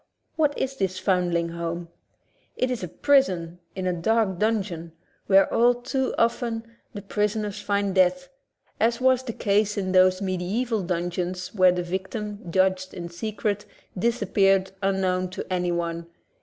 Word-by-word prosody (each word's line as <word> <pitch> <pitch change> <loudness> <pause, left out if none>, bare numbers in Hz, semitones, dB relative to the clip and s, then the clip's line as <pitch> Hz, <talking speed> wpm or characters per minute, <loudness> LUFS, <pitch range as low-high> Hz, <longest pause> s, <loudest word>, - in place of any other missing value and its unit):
What 300 -3 +1
is 270 0 -2
this 190 -3 -1
foundling 175 -3 +1
home? 170 0 -4 0.7
It 255 0 0
is 250 - -2
a 180 - -3
prison 180 - +2 0.2
in 190 -1 -3
a 180 - +1
dark 190 +1 +1
dungeon, 190 -7 -1 0.3
where 195 0 +6
all 240 +1 +5
too 260 +2 -2
often 230 -1 0 0.3
the 205 - -8
prisoner 210 +1 -1
finds 200 -1 -1
death, 190 +9 +3 0.5
as 230 +2 +2
was 260 0 +4
the 260 -2 -5
case 210 -1 +1
in 190 -2 -1
those 185 0 +5
mediaeval 200 +5 -1
dungeons 180 +1 -3
where 185 -3 +5
the 175 0 -2
victim, 190 +1 -5
judged 185 0 +1
in 170 -1 -6
secret, 205 +3 -3 0.3
disappeared 195 -3 +2
unknown 185 -2 0
to 185 - -6
anyone. 170 -2 -1
190 Hz, 140 wpm, -25 LUFS, 180-220 Hz, 0.7 s, where